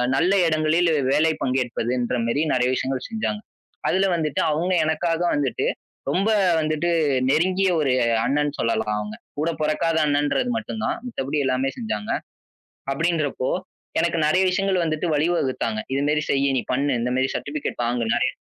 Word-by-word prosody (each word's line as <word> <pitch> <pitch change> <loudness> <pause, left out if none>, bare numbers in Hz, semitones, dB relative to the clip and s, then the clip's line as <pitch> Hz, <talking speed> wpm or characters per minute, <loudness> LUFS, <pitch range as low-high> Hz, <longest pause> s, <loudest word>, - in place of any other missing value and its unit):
நல்ல 175 +7 +3
இடங்களில் 160 +2 +2 0.2
வேலை 160 +3 +3
பங்கேற்பதுன்ற 125 -1 -1
மாரி 115 +5 0
நிறைய 125 -1 +2
விஷயங்கள் 130 0 -2
செஞ்சாங்க. 215 -1 -2 0.5
அதுல 190 +2 +2
வந்துட்டு 155 -4 -1
அவங்க 175 +5 0
எனக்காக 165 +2 0
வந்துட்டு 140 -3 -1 0.4
ரொம்ப 195 +8 +1 0.3
வந்துட்டு 155 +2 0 0.4
நெருங்கிய 185 +6 +2
ஒரு 140 -4 +2 0.3
அண்ணன் 145 +2 +1
சொல்லலாம் 115 -2 0
அவங்க. 105 0 -5 0.2
கூடப் 160 +2 -1
பொறக்காத 155 +2 +1
அண்ணன்றது 145 - +1
மட்டும்தான். 220 -1 -3
மத்தபடி 150 - -3
எல்லாமே 130 +1 +1
செஞ்சாங்க. 110 -2 -3 0.8
அப்படின்றப்போ 155 -4 0 0.5
எனக்கு 170 0 +1
நெறைய 185 +5 +3
விஷயங்கள் 190 -1 +1
வந்துட்டு 160 +2 -1
வழிவகுத்தாங்க. 135 -8 0
இது 140 - 0
மாரி 150 0 +1
செய், 140 0 +2
நீ - - -1
பண்ணு, 140 +2 +1
இந்த 125 +1 -1
மாரி 130 +1 +1
சர்டிபிகேட் 145 -4 -4
வாங்குனு 120 -1 0
நெறைய. - - +1
150 Hz, 140 wpm, -23 LUFS, 130-170 Hz, 0.8 s, நல்ல